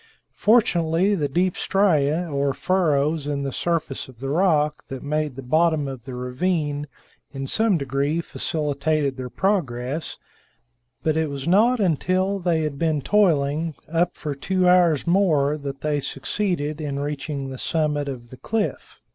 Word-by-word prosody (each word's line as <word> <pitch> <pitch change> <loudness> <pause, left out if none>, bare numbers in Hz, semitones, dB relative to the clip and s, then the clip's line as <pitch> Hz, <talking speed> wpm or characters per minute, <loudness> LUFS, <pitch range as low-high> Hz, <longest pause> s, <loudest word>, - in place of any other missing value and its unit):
Fortunately, 185 -4 +3
the 155 -7 0
deep 180 +5 +1
striae 175 -4 +2
or 140 -3 -1
furrows 155 -5 +1
in 140 -1 -2
the 135 - -2
surface 165 -3 -2
of 125 -3 -16
the 135 +1 -3
rocks 150 -3 +2
that 135 -1 -7
made 150 -1 -1
the 135 - -7
bottom 155 +2 +2
of 130 -3 -7
the 130 -2 -6
ravine 145 +3 -1 0.5
in 135 -1 -4
some 220 +6 +2
degree 140 +3 -1
facilitated 150 -3 -1
their 130 -1 -6
progress, 150 -6 -1 0.9
but 155 -1 +1
it 160 -1 0
was 140 0 -5
not 225 +7 +4
until 185 +2 +1
they 170 -3 +1
had 145 -2 -3
been 155 -4 0
toiling 160 -5 +2 0.2
up 170 +1 +1
for 150 -2 -3
two 185 +6 0
hours 175 -5 +4
more 165 -6 +3
that 140 -2 -6
they 150 -1 0
succeeded 155 +1 -2
in 145 -2 -3
reaching 140 -1 -4
the 130 - -7
summit 150 -3 0
of 120 -3 -8
the 130 - -10
cliff. 220 - -3
150 Hz, 155 wpm, -23 LUFS, 140-175 Hz, 0.9 s, not